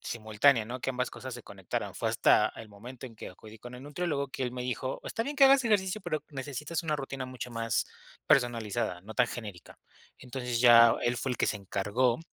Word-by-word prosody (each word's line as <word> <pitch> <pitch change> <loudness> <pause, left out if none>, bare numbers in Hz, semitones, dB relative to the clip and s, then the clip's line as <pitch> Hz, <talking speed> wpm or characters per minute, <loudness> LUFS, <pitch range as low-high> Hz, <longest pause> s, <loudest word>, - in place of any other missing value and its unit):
simultánea, 110 +2 +2
¿no?, 125 +3 -6
que - - -3
ambas 125 -1 -1
cosas 130 -1 -7
se 120 - -9
conectaran, 95 -4 -5
fue - - -1
hasta - - +4
el 110 -1 -10
momento 120 +6 -11
en 120 -3 -9
que - - -8
acudí 110 +4 -13
con 120 +3 -10
el 125 - -10
nutriólogo, 145 -1 -2
que 135 - -5
él 125 -1 -2
me 125 0 -4
dijo: 125 +1 -3
"Está 225 - -2
bien 285 +5 -5
que 275 - +7
hagas 270 0 +6
ejercicio, 205 -2 +1
pero 165 -5 -3
necesitas 145 +4 -4
una 155 -2 -1
rutina 135 -2 -5
mucho 130 -1 -7
más 115 -1 -1 0.4
personalizada, 115 -6 +1
no 110 +3 -9
tan 125 - +3
genérica". 105 -8 -9 0.4
Entonces, 125 -2 -4
ya 115 -1 +8
él 120 0 +1
fue 130 - -2
el - - -3
que - - +1
se - - 0
encargó 110 +6 0
125 Hz, 215 wpm, -29 LUFS, 115-140 Hz, 0.4 s, ya